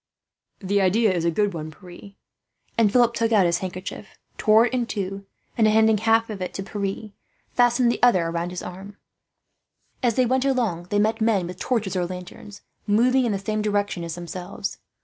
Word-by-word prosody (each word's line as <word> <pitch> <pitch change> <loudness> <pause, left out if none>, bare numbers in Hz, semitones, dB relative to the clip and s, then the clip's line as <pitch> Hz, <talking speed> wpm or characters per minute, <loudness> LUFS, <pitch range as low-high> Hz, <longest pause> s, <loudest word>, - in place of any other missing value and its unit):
"The 200 +1 +1
idea 200 +2 +3
is 170 -2 -1
a - - +3
good 205 +4 0
one, 155 -2 -5
Pierre;" 180 +4 -13 0.6
and 220 -3 +3
Philip 240 0 +4
took 230 -1 0
out 205 -4 +5
his 170 0 +1
handkerchief, 185 +2 -7 0.2
tore 220 +2 +5
it 245 - -3
in 245 -2 0
two 195 -2 -5 0.3
and, 220 -3 +3
handing 220 0 +4
half 225 +1 +2
of 200 -3 -7
it 180 - -5
to 195 - -4
Pierre, 200 +1 -4 0.4
fastened 245 0 +3
the - - -4
other 185 -9 +4
round 170 +1 -2
his 180 0 -6
arm. 195 +3 -9 1.0
As 240 -4 +1
they 255 - +3
went 260 +2 +1
along, 230 -11 0
they 205 - 0
met 220 +2 +1
men 215 -5 +2
with 180 +1 -8
torches 220 -7 -1
or 180 -1 0
lanterns, 185 +3 -10 0.2
moving 250 +5 +3
in - - 0
the 200 - 0
same 215 +2 -2
direction 205 -3 -1
as 165 -1 -5
themselves. 175 +3 -6
205 Hz, 190 wpm, -23 LUFS, 185-225 Hz, 1.0 s, out